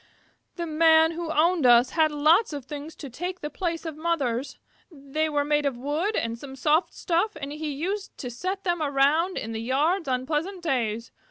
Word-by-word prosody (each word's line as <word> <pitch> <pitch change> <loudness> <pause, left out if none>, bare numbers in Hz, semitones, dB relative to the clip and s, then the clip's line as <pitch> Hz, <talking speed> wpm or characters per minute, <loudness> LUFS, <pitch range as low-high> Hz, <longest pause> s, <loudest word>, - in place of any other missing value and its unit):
The 340 - -3
Man 320 0 +5
who 335 0 -5
owned 325 +1 +2
us 245 +1 +6
had 315 -2 +3
a 300 - -7
lot 325 +6 +4
of 285 -4 -6
things 295 +3 -7
to 285 - -8
take 355 +9 -5
the 295 - -4
place 340 0 -3
of 320 -2 -4
mothers. 290 -6 -1 0.3
They 305 +1 -2
were 290 -1 0
made 295 -1 +2
of 265 -4 -3
wood 305 - -1
and 230 0 -2
some 270 0 -9
soft 300 +6 +2
stuff 365 +5 0
and 280 0 -5
he 305 0 -4
used 380 +8 -4
to 250 - -6
set 370 +11 -4
them 345 -3 0
around 295 +5 +2
in 225 - -4
the 220 0 -4
yards 295 +9 +1
on 255 -1 -1
pleasant 335 +6 -2
days. 230 -7 -1
305 Hz, 200 wpm, -26 LUFS, 275-335 Hz, 0.3 s, us